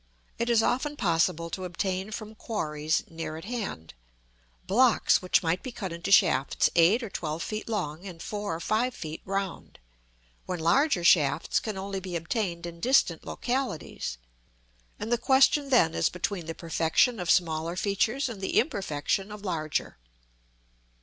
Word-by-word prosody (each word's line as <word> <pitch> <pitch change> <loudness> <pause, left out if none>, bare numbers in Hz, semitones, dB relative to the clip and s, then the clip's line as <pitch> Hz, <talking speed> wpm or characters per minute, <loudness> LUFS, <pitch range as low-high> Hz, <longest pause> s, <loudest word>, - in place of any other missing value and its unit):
It 235 +1 0
is 230 -2 +4
often 290 +6 0
possible 165 - +1
to 185 - -4
obtain 185 +2 -2
from 215 0 -7
quarries 155 -8 -2
near 160 -1 -6
at 165 - -9
hand, 210 - -5 0.7
blocks 240 +4 +4
which 180 0 +2
might 170 +2 0
be 255 - -6
cut 195 -7 -5
into 170 +3 -4
shafts 170 -9 +4
eight 180 +9 +5
or 225 - -5
twelve 160 -1 -3
feet 215 +1 -5
long 180 -4 -3
and 175 -3 -9
four 205 0 -4
or - - -6
five 230 +8 0
feet 155 -1 -7
round, 195 -1 -4 0.7
when 180 -2 -3
larger 180 - +3
shafts 150 -3 +4
can 215 -3 -5
only 195 0 -4
be 185 -2 -6
obtained 170 0 -2
in 170 -1 -8
distant 230 -8 +2
localities; 245 - -3 0.8
and 220 - -4
the 240 - +2
question 270 +3 +4
then 175 -12 +4
is - - +2
between 180 -1 -3
the 165 - -4
perfection 165 +8 +1
of 175 -2 -3
smaller 165 -1 +2
features 215 +8 0
and 225 -5 -7
the 190 - -1
imperfection 195 - 0
of 210 0 -9
larger. 155 - -2
185 Hz, 155 wpm, -28 LUFS, 165-220 Hz, 0.8 s, eight